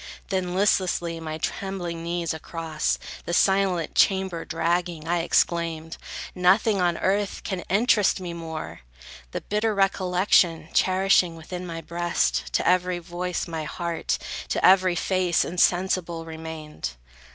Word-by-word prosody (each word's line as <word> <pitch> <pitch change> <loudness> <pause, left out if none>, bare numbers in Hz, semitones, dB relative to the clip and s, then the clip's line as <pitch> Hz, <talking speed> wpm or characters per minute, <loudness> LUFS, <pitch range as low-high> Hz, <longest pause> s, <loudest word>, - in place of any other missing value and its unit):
Then, 185 -2 -1
listlessly, 185 -4 +1
my 155 -1 -5
trembling 175 -2 -4
knees 170 -1 -2
across 160 -1 -2 0.3
The 170 - -1
silent 190 -5 +2
chamber 190 -3 +2
dragging, 165 0 -1
I 175 +1 +1
exclaimed, 165 -1 0 0.4
"Nothing 190 +3 +3
on 175 -1 +2
earth 200 +1 0
can 190 -2 -3
interest 210 -1 +3
me 175 -2 -5
more!" 160 -2 -6 0.5
The - - -4
bitter 210 +1 0
recollection 180 -4 +2
cherishing 185 -2 +3
Within 180 +3 -7
my 165 -1 -5
breast, 175 +1 -1
to - - +1
every 180 0 +2
voice 175 +1 -4
my 160 -2 -4
heart, 170 +1 -2 0.3
To - - +1
every 185 -1 +5
face, 180 -1 +1
insensible 175 -1 +1
remained. 160 - -6
175 Hz, 125 wpm, -25 LUFS, 165-185 Hz, 0.5 s, every